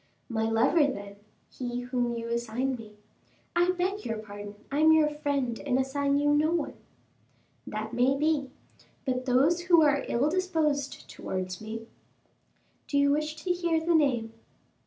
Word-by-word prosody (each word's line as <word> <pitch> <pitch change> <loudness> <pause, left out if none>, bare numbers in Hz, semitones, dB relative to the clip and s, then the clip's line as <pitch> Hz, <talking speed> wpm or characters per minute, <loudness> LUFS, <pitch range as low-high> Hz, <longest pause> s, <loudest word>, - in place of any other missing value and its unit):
"My 225 -1 0
lover, 260 +7 +4
then, 200 -6 -6 0.3
he 245 -1 -4
whom 245 -1 -1
you 230 0 -4
assign 235 +3 -1
me 215 -3 -11 0.3
" - - -36
"I 350 +1 +3
beg 370 +3 -1
your 225 -2 -3
pardon; 205 -1 -8 0.2
I 285 - 0
am 315 +1 +6
your 315 -1 +5
friend, 285 -5 -1
and 260 -3 +1
assign 280 +1 +1
you 290 0 +3
no 300 +1 +3
one." 335 -3 -1 0.9
"That 215 +2 -5
may 255 +3 +3
be; 300 -2 +1 0.6
but 255 -1 -1
those 300 +8 +3
who 340 -3 +6
are 285 -2 +3
ill 245 +5 +1
disposed 310 -5 -1
towards 185 0 -5
me." 225 +1 -6 1.0
"Do 285 - 0
you 280 0 +4
wish 305 +1 0
to 365 - 0
hear 345 -2 +1
the 335 +2 +1
name?" 250 -8 +2
275 Hz, 160 wpm, -28 LUFS, 235-310 Hz, 1.0 s, am